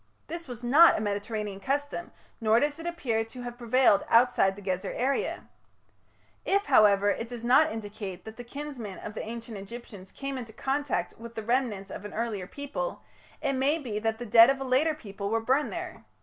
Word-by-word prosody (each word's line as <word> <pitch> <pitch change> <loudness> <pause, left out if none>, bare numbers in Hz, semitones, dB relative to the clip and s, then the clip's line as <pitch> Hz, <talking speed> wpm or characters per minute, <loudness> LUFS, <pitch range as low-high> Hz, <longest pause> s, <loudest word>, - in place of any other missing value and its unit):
This 335 -1 -6
was 245 -2 -8
not 295 +8 +7
a - - -1
Mediterranean 205 -1 -3
custom, 285 +7 -2 0.3
nor 220 +1 +5
does 290 +3 0
it 330 - -5
appear 245 -10 -1
to 245 +2 -9
have 240 0 -6
prevailed 240 -3 +4
outside 230 -5 +4
the 205 - -11
Gezer 185 0 -2
area. 270 +3 -1 1.0
If, 400 +1 +1
however, 205 -1 +5
it 230 - -3
does 240 -2 -7
not 280 +6 +5
indicate 205 -4 -6
that 220 0 -8
the 245 - -8
kinsmen 245 -6 -7
of 210 - -7
the - - -4
Ancient 230 -1 -7
Egyptians 200 -2 -10
came 275 -1 -4
into 225 -3 -8
contact 275 +4 -1
with 230 0 -10
the 220 - -4
remnants 225 -6 0
of - - -7
an 210 - -8
earlier 215 -5 -2
people, 285 - -5 0.4
it 280 -2 +1
may 270 +4 +2
be 235 -9 -4
that 225 0 -1
the 245 - -6
dead 230 +2 +8
of 275 0 +1
a - - -3
later 270 +5 +2
people 200 -7 -6
were 225 +1 +1
burned 260 +6 +1
there. - - -6
235 Hz, 195 wpm, -28 LUFS, 210-270 Hz, 1.0 s, dead